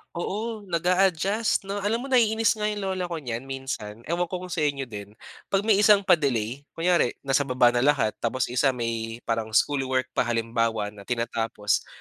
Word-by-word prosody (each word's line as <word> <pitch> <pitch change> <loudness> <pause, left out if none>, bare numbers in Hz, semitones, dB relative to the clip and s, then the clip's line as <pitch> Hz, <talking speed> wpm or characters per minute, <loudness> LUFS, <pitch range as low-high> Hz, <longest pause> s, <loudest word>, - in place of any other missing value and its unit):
Oo. 210 +4 -4
Nag-a-adjust, 185 +5 +1
'no? 200 +1 -4
Alam 220 +4 -1
mo, - - -5
naiinis 225 -2 +4
nga 210 - 0
yung 210 -1 -3
lola 190 -2 -2
ko 175 - -4
niyan 130 -4 -5
minsan. 120 -5 -6
Ewan 175 +4 -1
ko 180 +1 -5
kung 180 - -8
sa 170 - -2
inyo 140 -2 0
din. 105 -4 -9 0.3
'Pag 195 0 +1
may 215 -2 +4
isang 205 -1 +6
pa-delay. 140 - +1
Kunyari 170 -6 +2
nasa 135 +1 +1
baba 125 -1 +4
na 120 - +1
lahat 130 -5 +3
tapos 125 +2 -1
yung 125 - -1
isa 135 -3 +3
may 115 -1 -4
parang 110 -1 -2
schoolwork 130 -2 +1
pa, 125 - 0
halimbawa, 115 -2 0
na 100 -1 -14
tinatapos, 115 -3 -1
140 Hz, 185 wpm, -25 LUFS, 115-190 Hz, 0.3 s, isang